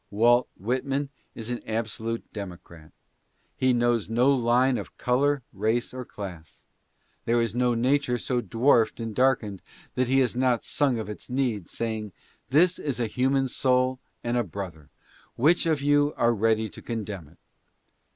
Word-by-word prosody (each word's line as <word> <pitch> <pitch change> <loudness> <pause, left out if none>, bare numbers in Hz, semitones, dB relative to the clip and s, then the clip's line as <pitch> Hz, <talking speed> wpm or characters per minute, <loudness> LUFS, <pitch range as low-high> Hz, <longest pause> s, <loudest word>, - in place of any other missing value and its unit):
Walt 120 +4 +4
Whitman 135 +6 -1 0.3
is 115 +1 -6
an 120 - -3
absolute 115 +1 -2
democrat. 90 -5 -9 0.6
He 130 0 +2
knows 120 -3 +1
no 125 +5 +4
line 125 +1 +3
of - - -9
color, 135 +2 +1
race 110 +5 0
or 130 0 -5
class. 90 -8 -9 0.6
There 120 +1 +2
is 115 -2 0
no 120 0 +2
nature 125 +1 +2
so 125 +1 -1
dwarfed 115 +2 +2
and 115 -1 -4
darkened, 115 -6 +1 0.3
that 130 -1 0
he 135 +2 +2
has 125 -2 +1
not 125 -2 +2
sung 140 -5 +1
of 110 - -4
its 105 +4 -8
need, 125 -8 -1
saying, 110 -3 -4 0.4
"This 170 +7 +4
is 140 -4 -3
a 120 - +1
human 130 +4 +1
soul 130 0 +1 0.2
and 120 +1 0
a 120 - +2
brother; 85 -10 -7 0.5
which 165 +7 +3
of 155 -3 +1
you 145 0 +3
are 120 0 +3
ready 110 0 +1
to - - -11
condemn 105 -8 -5
it?" 80 - -21
120 Hz, 160 wpm, -26 LUFS, 110-130 Hz, 0.6 s, Walt